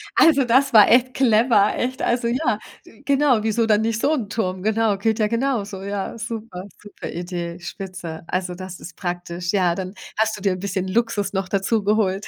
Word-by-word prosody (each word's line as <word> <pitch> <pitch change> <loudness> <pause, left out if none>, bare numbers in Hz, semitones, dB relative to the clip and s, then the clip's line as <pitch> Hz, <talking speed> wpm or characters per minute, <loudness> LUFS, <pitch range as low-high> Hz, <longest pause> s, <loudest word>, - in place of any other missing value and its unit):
Also, 300 -5 +5
das 260 +3 +3
war 215 -2 +8
echt 250 +2 +4
clever. 225 -4 +4
Echt. 255 +1 -2
Also, 240 0 +1
ja, 245 -2 0 0.2
wi 225 - -18
Genau. 275 -4 +3
Wieso 225 +1 +1
dann 215 -1 +3
nicht 225 0 -1
so 285 +6 +2
'n 240 -9 -2
Turm? 185 -4 -2
Genau. 220 -1 +1
Geht 220 +3 0
ja 215 - +3
genauso. 230 -5 -2
Ja. 200 +2 -4
Super, 225 -5 -6 0.2
super 205 -1 -8
Idee. 175 0 -5
Spitze. 180 -2 -7
Also, 180 0 -2
das 185 0 -8
ist 170 - -10
praktisch, 175 -1 -4
ja. 180 -4 +2
Dann 185 0 -5 0.2
hast 220 0 +1
du - - -11
dir 195 -1 +1
'n 185 - -6
bisschen 190 -1 -3
Luxus 205 -1 0
noch 190 -1 -2
dazu 200 +3 0
geholt 205 -1 +1
210 Hz, 195 wpm, -22 LUFS, 185-230 Hz, 0.2 s, war